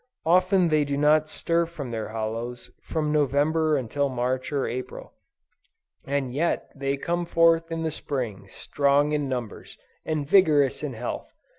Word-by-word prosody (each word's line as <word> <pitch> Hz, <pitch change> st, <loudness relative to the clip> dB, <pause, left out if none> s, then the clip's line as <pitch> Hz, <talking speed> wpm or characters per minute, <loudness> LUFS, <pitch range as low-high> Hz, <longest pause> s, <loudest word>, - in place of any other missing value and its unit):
Often 185 Hz, +1 st, +4 dB
they 155 Hz, -1 st, +3 dB
do 140 Hz, -1 st, -2 dB
not 155 Hz, +1 st, +3 dB
stir 170 Hz, +1 st, 0 dB
from 145 Hz, -7 st, -7 dB
their 110 Hz, -2 st, -3 dB
hollows, 115 Hz, +2 st, -5 dB
from 155 Hz, -2 st, -2 dB
November 150 Hz, +2 st, +2 dB
until 140 Hz, +3 st, -1 dB
March 130 Hz, +1 st, -2 dB
or 140 Hz, -2 st, 0 dB
April; 125 Hz, +1 st, -6 dB, 0.9 s
and 135 Hz, -2 st, -1 dB
yet 165 Hz, +5 st, -1 dB
they 140 Hz, 0 st, -2 dB
come 175 Hz, +4 st, -1 dB
forth 165 Hz, -1 st, +3 dB
in 165 Hz, 0 st, -2 dB
the 160 Hz, -, -1 dB
Spring, 120 Hz, -10 st, -4 dB
strong 140 Hz, +6 st, +1 dB
in 145 Hz, -2 st, -1 dB
numbers, 120 Hz, -5 st, -5 dB, 0.3 s
and 155 Hz, -3 st, -2 dB
vigorous 150 Hz, -7 st, +4 dB
in 150 Hz, -4 st, -4 dB
health. 120 Hz, +1 st, -5 dB
145 Hz, 150 wpm, -25 LUFS, 130-160 Hz, 0.9 s, Often